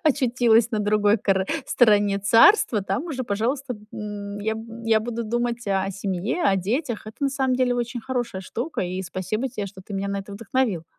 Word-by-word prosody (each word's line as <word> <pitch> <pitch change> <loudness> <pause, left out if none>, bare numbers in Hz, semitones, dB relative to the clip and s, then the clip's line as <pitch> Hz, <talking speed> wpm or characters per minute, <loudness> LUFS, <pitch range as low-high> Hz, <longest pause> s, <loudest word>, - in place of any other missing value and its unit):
очутилась 240 -5 +3
на 220 - -1
другой 210 0 +3
кор 190 -1 +1 0.2
стороне 205 -4 +4
царства, 225 - +5
там 195 - -2
уже, 260 -6 -3
пожалуйста, 250 +5 -1 0.2
м, 205 -1 -6
я, 220 +2 0
м, 225 +1 -8
я 225 -1 +3
буду 235 +1 -4
думать 240 +1 -2
о 195 0 0
семье, 195 - -2
о 195 - +2
детях. 230 - -2
Это 215 - -9
на 280 - +3
самом 265 -2 0
деле 250 -1 +2
очень 240 0 -3
хорошая 240 -6 -3
штука, 245 - -4
и 185 +1 -3
спасибо 190 +7 -3
те, 210 -4 -4
что 190 -1 -11
ты 200 - -8
меня 195 +1 -2
на 200 0 -2
это 195 +1 -10
вдохновил. 205 -3 -1
220 Hz, 190 wpm, -24 LUFS, 200-245 Hz, 0.2 s, царства